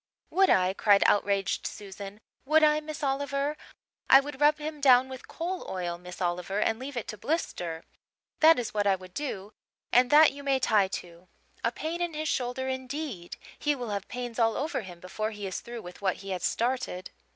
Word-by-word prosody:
"Would 385 +1 +4
I?" 185 0 +4
cried 200 0 +4
outraged 200 -1 +2
Susan. 200 +1 -9 0.2
"Would 310 +3 +4
I, 300 0 +5
Miss 305 0 -7
Oliver? 280 +1 -1 0.5
I 270 - +10
would 280 0 -6
rub 295 +1 +5
him 305 0 -6
down 260 -1 +6
with 260 -1 -9
coal 355 +3 -4
oil, 175 -2 -3
Miss 180 0 -10
Oliver 180 +2 -1
and 225 +1 +1
leave 265 0 -6
it 235 - -3
to 215 - -6
blister. 175 - -3 0.6
That 320 +1 +7
is 235 -3 -3
what 205 -1 +1
I 195 - +4
would 185 -1 -13
do 210 -8 -5 0.4
and 250 0 +5
that 300 +1 +7
you 280 - -10
may 275 -1 +2
tie 210 -6 +3
to. 175 -1 -8 0.4
A - - +2
pain 335 +2 -4
in 345 -2 -2
his 310 +1 -2
shoulder, 255 +1 -1
indeed! 260 - -5 0.2
He 295 0 +1
will 245 -5 -5
have 200 -1 -3
pains 245 -1 -5
all 225 -1 +3
over 295 -1 -2
him 180 -4 -10
before 215 +4 -3
he 205 -2 -7
is 190 - -3
through 235 -1 -8
with 180 +2 -11
what 190 -2 +1
he 195 - -5
has 185 - -3
started." 240 -6 -1
240 Hz, 200 wpm, -28 LUFS, 195-285 Hz, 0.6 s, I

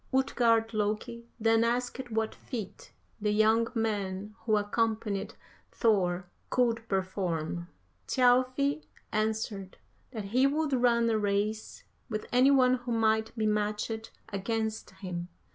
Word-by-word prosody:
"Utgard 230 -4 +2
Loki 215 +2 -2
then 225 0 +4
asked 245 +2 -1
what 220 -1 -1
feat 220 -7 -7 0.3
the 210 - +1
young 220 +2 +4
man 205 -2 -2
who 215 -2 +3
accompanied 215 -1 -1 0.4
Thor 185 -6 +1 0.2
could 230 -2 +1
perform. 175 -3 -2 0.4
Thjalfi 255 +4 +3 0.3
answered 215 -3 -2 0.3
that 220 -5 -6
he 260 +2 +5
would 300 0 0
run 240 -2 +3
a 220 - +2
race 210 +1 -1 0.3
with 215 -2 -3
any 255 +2 +5
one 255 -2 +5
who 245 -1 -6
might 220 0 +1
be 220 - 0
matched 210 +1 -1 0.2
against 220 +2 -2
him. 175 -3 -6
220 Hz, 120 wpm, -30 LUFS, 210-240 Hz, 0.4 s, he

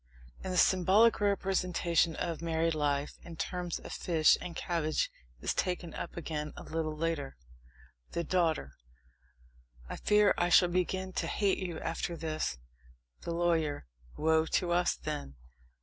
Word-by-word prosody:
And 190 - -3
the 180 - -1
symbolic 190 +7 +5
representation 180 -4 +1
of 170 -3 -3
married 165 0 +1
life 145 -1 -1
in 170 - -10
terms 180 0 -3
of - - -9
fish 160 -3 +4
and 175 -2 -6
cabbage 160 -3 -1 0.3
is - - 0
taken 180 -2 -2
up 175 - -6
again 150 -2 -4
a - - -8
little 155 -1 -3
later: 155 -4 -2 0.8
THE 170 - -1
DAUGHTER. 165 - +1 1.2
I - - -6
fear 210 0 +4
I 175 - +2
shall 180 0 +6
begin 185 +1 -1
to - - -1
hate 200 -2 +1
you 175 -4 -4
after 165 +1 -3
this! 155 - -2 0.6
THE - - -4
LAWYER. 165 - 0 0.3
Woe 160 +1 +3
to 175 +1 0
us, 175 +1 +2
then! 70 -1 -5
170 Hz, 145 wpm, -31 LUFS, 160-180 Hz, 1.2 s, shall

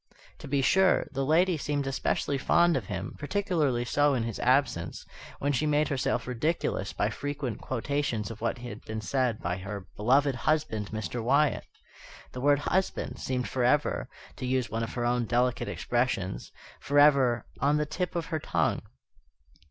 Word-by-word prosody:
To - - -9
be 135 0 +1
sure, 190 +8 +4
the 135 -1 -2
lady 165 +5 +3
seemed 145 -1 -1
especially 135 +1 -1
fond 170 +5 +4
of 120 -8 -2
him, 95 -2 -4
particularly 150 -7 0
so 145 +3 +3
in 120 - 0
his 115 -2 -4
absence, 125 -11 +1 0.3
when 145 +1 0
she 150 +4 +1
made 150 0 +2
herself 135 -3 0
ridiculous 125 - -1
by 105 - -1
frequent 145 -2 -4
quotations 130 -4 -2
of 110 - -10
what 115 - -1
had 120 -3 -8
been 110 0 -5
said 125 -1 -1
by 90 +1 -1
her 100 0 -6
"beloved 135 +6 +3
husband, 125 -5 0
Mr. 110 +2 -4
Wyatt." 140 +5 +2 0.6
The 125 - -6
word 145 +1 +4
"husband" 190 +5 -1
seemed 125 -1 -2
forever, 130 +3 +1 0.3
to 130 - -4
use 125 -4 0
one 115 +1 -1
of 115 - -4
her 120 -1 -1
own 120 0 +1
delicate 120 +1 +1
expressions, 120 -6 -1 0.3
forever 140 -4 +4
"on 145 +2 +3
the 150 - +1
tip 175 +4 -3
of 170 -1 -1
her 160 - +1
tongue." - - 0
130 Hz, 165 wpm, -28 LUFS, 115-145 Hz, 0.6 s, sure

